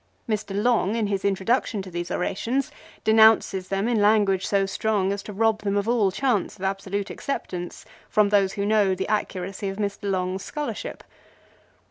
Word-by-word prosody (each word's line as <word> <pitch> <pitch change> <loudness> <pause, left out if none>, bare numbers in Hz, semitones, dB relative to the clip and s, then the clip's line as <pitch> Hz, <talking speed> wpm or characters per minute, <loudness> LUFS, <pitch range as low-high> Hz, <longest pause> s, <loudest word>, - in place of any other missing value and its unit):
Mr. 210 -3 -2
Long 225 -2 +2
in 225 -2 0
his 200 -1 -2
introduction 200 +2 0
to 185 - -10
these 175 0 -4
orations 240 +9 -1 0.3
denounces 220 -4 +4
them 195 +3 -1
in 235 -3 +2
language 205 -2 +3
so 200 -1 +2
strong 195 0 0
as 200 - -4
to 210 - -8
rob 220 +1 +1
them 200 -1 0
of 200 +1 -1
all 230 -4 +3
chance 215 0 0
of 190 - -10
absolute 195 +1 -2
acceptance 180 -10 -5 0.2
from 210 -1 +3
those 200 -2 +3
who 200 - -2
know 205 -3 +3
the 190 - -3
accuracy 195 -2 -2
of 195 - -6
Mr. 200 -1 -3
Long's 185 0 -1
scholarship. 295 -1 -5
200 Hz, 170 wpm, -24 LUFS, 195-220 Hz, 0.3 s, denounces